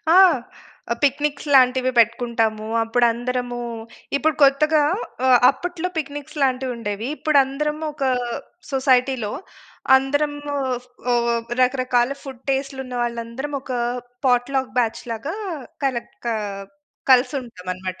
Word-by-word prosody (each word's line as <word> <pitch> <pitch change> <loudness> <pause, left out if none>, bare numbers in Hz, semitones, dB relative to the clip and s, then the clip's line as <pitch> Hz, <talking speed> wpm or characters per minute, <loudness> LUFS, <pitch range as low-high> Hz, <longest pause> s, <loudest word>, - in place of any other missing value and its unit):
ఆ! - - +8 0.8
పిక్నిక్స్ 290 +1 +1
లాంటివి 255 0 +5
పెట్టుకుంటాము. 230 -2 +1 0.2
అప్పుడు 240 +2 +2
అందరమూ, 245 0 -3 0.6
ఇప్పుడు 310 +1 +1
కొత్తగా 300 +2 +5 0.4
ఆహ్, 255 -1 +7
అప్పట్లో 350 +4 -4
పిక్నిక్స్ 290 0 -6
లాంటివుండేవి. 245 -4 -1
ఇప్పుడు 310 -2 +2
అందరం 300 +3 -2
ఒకా 275 -3 0 0.6
సొసైటీ‌లో 260 -4 +2 0.6
అందరము 290 +2 -1 0.6
ఉ - - +4 0.5
రకరకాల 255 -1 +2
ఫుడ్ 265 -3 -9
టెస్ట్‌లు 270 0 -2
ఉన్న 250 -1 -8
వాళ్ళందరం 235 +4 -4
ఒక 260 - -7 0.5
పాట్‌లక్ 255 +1 +1
బ్యా‌చ్‌ 230 -2 0
లాగా 255 - -4 0.5
కలక్కా 240 -2 -2 0.8
కలిసి 255 +2 +5
ఉంటాం 225 -7 -12
అన‌మాట. 185 0 -6
260 Hz, 105 wpm, -22 LUFS, 240-280 Hz, 0.8 s, ఆ